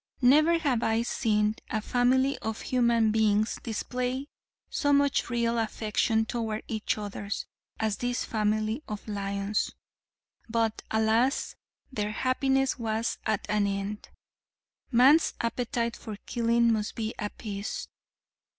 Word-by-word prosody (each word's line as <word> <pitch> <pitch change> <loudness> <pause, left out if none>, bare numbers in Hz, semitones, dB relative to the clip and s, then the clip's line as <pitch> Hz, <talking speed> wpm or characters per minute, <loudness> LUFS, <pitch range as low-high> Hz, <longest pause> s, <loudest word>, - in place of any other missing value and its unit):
Never 305 +7 +6
have 280 -8 +1
I 225 0 +1
seen 215 -3 +1
a 215 - 0
family 255 +4 +2
of 220 0 -4
human 235 -3 +2
beings 215 0 +2
display 250 +3 -2 0.4
so 285 - 0
much 285 -2 +3
real 235 -1 +1
affection 220 0 +1
toward 220 -2 -3
each 220 -1 -1
others 205 0 -4 0.3
as 220 -2 0
this 245 0 -1
family 215 +3 0
of 210 0 -6
lions. 200 0 -1 0.8
But 225 -1 0
alas, 220 +5 +2 0.4
their 210 -4 -2
happiness 265 +2 +1
was 225 0 -1
at 215 -2 0
an 210 -1 +2
end. 200 +1 -4 0.8
Man's 270 +6 +5
appetite 235 0 -1
for 215 -2 -7
killing 235 0 +2
must 215 -1 -2
be 220 0 -3
appeased. 205 -1 -4
225 Hz, 120 wpm, -28 LUFS, 215-245 Hz, 0.8 s, Never